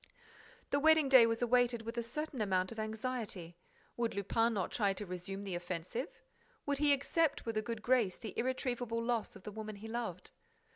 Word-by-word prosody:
The 285 - +3
wedding 315 -1 +5
day 255 -4 +9
was 230 +1 0
awaited 245 -1 +3
with 230 +1 -5
a 235 - 0
certain 265 +2 -4
amount 185 -2 +1
of 225 - -7
anxiety. 220 -6 -4 0.4
Would 235 -3 -1
Lupin 225 +3 +1
not 190 - -1
try 200 -4 +2
to 205 +2 -5
resume 185 +2 -5
the 195 -2 -4
offensive? 175 - -4 0.4
Would 285 -1 0
he 295 -1 +5
accept 285 +3 +2
with 230 -1 -2
a 215 - +2
good 220 0 -5
grace 240 -7 +2
the 220 -5 -7
irretrievable 245 -2 -1
loss 230 -2 -1
of - - -12
the 210 - -6
woman 215 0 -6
he 210 +2 -9
loved? 225 -6 -4
230 Hz, 190 wpm, -34 LUFS, 200-250 Hz, 0.4 s, day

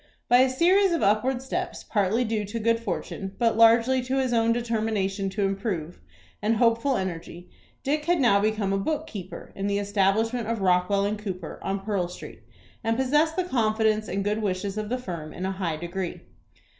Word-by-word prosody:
By 245 - +6
a 260 +1 +5
series 360 +8 +3
of 335 - 0
upward 245 +6 +2
steps, 265 - -4
partly 210 +3 +1
due 220 -2 -1
to 205 +4 -4
good 230 +1 +2
fortune, 195 -2 -5
but 230 -2 +2
largely 230 +3 +5
to 255 +2 -2
his 260 -2 +1
own 230 0 +3
determination 215 -4 -1
to 200 +2 -2
improve, 195 -4 -3 0.4
and 215 +2 +2
hopeful 230 +4 +2
energy, 175 -1 -6 0.3
Dick 295 +2 0
had 350 0 +2
now 235 -7 +4
become 210 -1 0
a 195 - +1
book 305 +9 -2
keeper 195 - -8
in 195 +1 -2
the 200 0 0
establishment 205 +3 +1
of 230 -1 -1
Rockwell 195 +2 +2
& - - -8
Cooper, 190 -5 -6
on 195 0 -2
Pearl 195 -3 -1
Street, 180 - -10 0.4
and 225 0 0
possessed 295 +5 +2
the 370 - +1
confidence 220 - +1
and 195 +1 -2
good 210 +2 -1
wishes 195 -1 -2
of 215 -1 -4
the 250 - 0
firm 170 -10 -6
in 180 - -5
a 190 - -1
high 180 -5 -2
degree. 175 +2 -5
215 Hz, 190 wpm, -26 LUFS, 195-240 Hz, 0.4 s, By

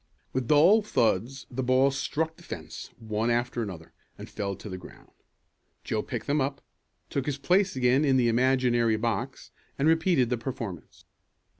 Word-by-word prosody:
With 130 -2 -1
dull 170 - +6
thuds 125 - 0
the 130 +2 -2
balls 130 +2 +3
struck 160 +4 -2
the - - -18
fence, - - -8
one 110 0 -2
after 120 0 0
the 100 - -4
other, 80 -3 -12 0.2
and - - -9
fell 100 -2 -4
to 105 - -10
the 95 -2 -6
ground. 90 - -15 0.7
Joe - - -1
picked - - -5
them 145 +1 +1
up, 140 +1 -2 0.5
took 140 -1 -2
his 145 -2 -1
place 185 +6 +2
again 130 +2 +3
in 135 -3 +3
the 120 -2 +3
imaginary 120 -2 +2
box, 110 -2 -3 0.3
and 140 - +2
repeated 160 -6 +3
the 125 - 0
performance. 115 -8 -7
130 Hz, 170 wpm, -27 LUFS, 115-140 Hz, 0.7 s, dull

